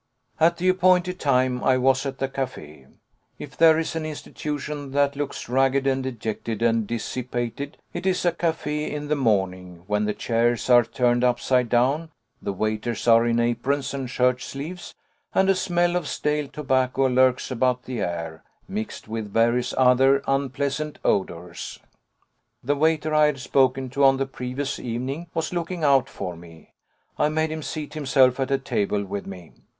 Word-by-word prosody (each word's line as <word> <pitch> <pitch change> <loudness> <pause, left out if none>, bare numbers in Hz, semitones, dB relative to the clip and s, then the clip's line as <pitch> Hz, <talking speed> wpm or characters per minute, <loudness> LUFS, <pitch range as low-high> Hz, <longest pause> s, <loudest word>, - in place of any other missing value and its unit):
At 170 +1 +4
the 180 - -1
appointed 185 0 +3
time 130 -2 +1
I 130 -1 +4
was 135 +2 +2
at 135 -1 -5
the 135 - -1
café. 100 - -6 0.5
If 145 - -9
there 160 -1 +6
is 165 0 -2
an 160 - -2
institution 150 -2 -5
that 140 0 +2
looks 145 0 -4
ragged 135 +2 +2
and 135 -1 +1
dejected 115 -3 -4
and 115 -2 +2
dissipated, 120 +3 -4 0.2
it 190 - -3
is 185 -1 +1
a 175 - +4
café 150 -3 -2
in 150 0 -5
the 150 - +2
morning, 95 - -1
when 105 +1 0
the 105 - -1
chairs 120 +1 0
are 120 -1 +7
turned 120 +1 +1
upside 125 0 +2
down, 135 +8 +2 0.3
the - - -2
waiters 110 +4 -2
are 115 0 +6
in 120 0 +2
aprons 120 +5 0
and 135 -2 -4
shirt 125 0 +1
sleeves, 160 +6 -7 0.4
and 190 0 +4
a - - +4
smell 175 -2 +1
of 175 -4 -1
stale 150 -1 -1
tobacco 130 -2 0
lurks 130 0 +2
about 125 0 +1
the 125 -2 -5
air, 85 -2 -4 0.2
mixed 210 - -5
with 110 -2 -5
various 120 +3 +2
other 130 +2 +4
unpleasant 140 +2 -1
odours. 90 -2 -2 0.8
The 145 +4 +1
waiter 155 +1 +1
I 155 0 +5
had 145 -3 -2
spoken 130 0 +1
to 140 +1 0
on 135 0 +6
the 135 - 0
previous 135 +1 -4
evening 130 +8 -4
was 165 +1 -2
looking 175 -1 -3
out 135 -3 +4
for 90 -1 -5
me. 85 -1 -15 0.5
I 150 - +3
made 155 0 0
him 155 0 -4
seat 150 0 -5
himself 135 -4 +3
at 135 - -1
a 135 - +2
table 100 -4 -1
with 100 +1 -5
me. 90 -4 -10
130 Hz, 170 wpm, -24 LUFS, 120-150 Hz, 0.8 s, are